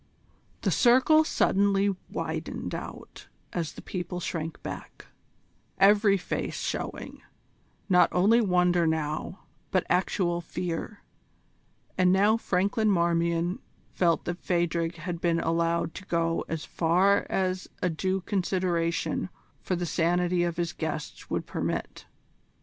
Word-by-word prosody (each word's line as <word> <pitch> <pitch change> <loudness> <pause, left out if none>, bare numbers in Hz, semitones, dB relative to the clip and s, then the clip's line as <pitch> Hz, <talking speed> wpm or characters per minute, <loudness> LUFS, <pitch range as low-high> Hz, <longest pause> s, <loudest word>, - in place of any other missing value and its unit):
The - - +1
circle 260 +6 +5
suddenly 200 -7 +2
widened - - -4
out - - -8 0.3
as 170 -3 -2
the - - -11
people 180 -1 -4
shrank 165 -2 -4
back, - - -8 0.7
every 200 +1 +5
face 180 - -3
showing, - - -4 0.7
not 180 -3 +5
only 210 +6 +4
wonder 180 -4 +3
now, 160 +3 -2 0.3
but 185 - +1
actual 180 -1 +1
fear; 175 +4 -5 1.0
and 180 0 +5
now 205 +3 +4
Franklin 205 +1 +1
Marmion 170 -1 +1 0.3
felt 170 -3 +1
that 175 0 -3
Phadrig 170 -1 0
had 170 +1 -5
been 170 -1 +2
allowed 165 0 0
to 190 - -9
go 165 -1 0
as 160 -2 -4
far 185 +4 +2
as 185 -1 -1 0.2
a 180 - +3
due 185 +4 -1
consideration 180 -3 -1 0.3
for 185 - -1
the 175 0 -2
sanity 175 +2 +1
of 170 -1 -2
his 170 -1 -1
guests 155 -2 -5
would - - -2
permit. - - -4
180 Hz, 120 wpm, -27 LUFS, 170-190 Hz, 1.0 s, circle